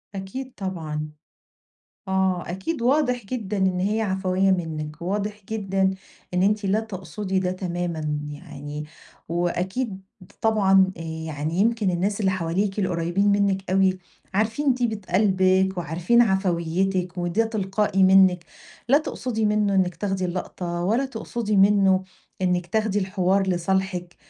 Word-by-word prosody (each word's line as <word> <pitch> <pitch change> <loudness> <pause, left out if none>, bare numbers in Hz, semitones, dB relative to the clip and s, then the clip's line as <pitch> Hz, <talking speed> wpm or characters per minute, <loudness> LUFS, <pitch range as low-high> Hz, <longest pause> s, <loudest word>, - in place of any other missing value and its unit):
أكيد 225 +8 -6
طبعًا، 155 -6 -4 1.0
آه، 190 -2 0
أكيد 210 - -3
واضح 250 -3 +2
جدًا 210 -2 -3
إن 190 -1 +1
هي 210 +4 0
عفوية 190 -1 +1
منِك، 155 -4 -3
وواضح 205 +3 -2
جدًا 195 -3 0 0.4
إن 180 +1 +2
أنتِ 210 +1 +2
لا 200 +3 +2
تقصدي 190 -2 -3
ده 180 -1 -1
تمامًا، 170 -5 -3
يعني 145 0 -7 0.5
وأكيد 190 +5 -2 0.4
طبعًا 195 -4 +4
آآ - - -7
يعني 160 -1 -4
يمكِن 220 -2 +2
الناس 195 +4 -1
اللي 195 -3 +2
حواليكِ 190 +3 -1
القريبين 185 +2 +1
منِك 195 -2 +1
أوي 190 -1 +3 0.3
عارفين 225 +7 +1
طيبة 235 -4 -1
قلبِك 190 -1 +3
وعارفين 175 +8 +2
عفويتِك، 185 -2 0
وده 175 +6 +1
تلقائي 200 -2 0
منِك، 185 -2 +5 0.4
لا 275 - +7
تقصدي 245 -7 -2
منه 210 -1 +2
إنِك 185 -2 +2
تاخدي 190 0 -2
اللقطة، 175 -1 -4
ولا 230 +9 +1
تقصدي 225 -3 -3
منه 195 -1 +4 0.4
إنِك 180 -1 +1
تاخدي 215 +1 0
الحوار 190 0 +1
لصالحِك، 180 0 -1
190 Hz, 125 wpm, -24 LUFS, 180-210 Hz, 1.0 s, لا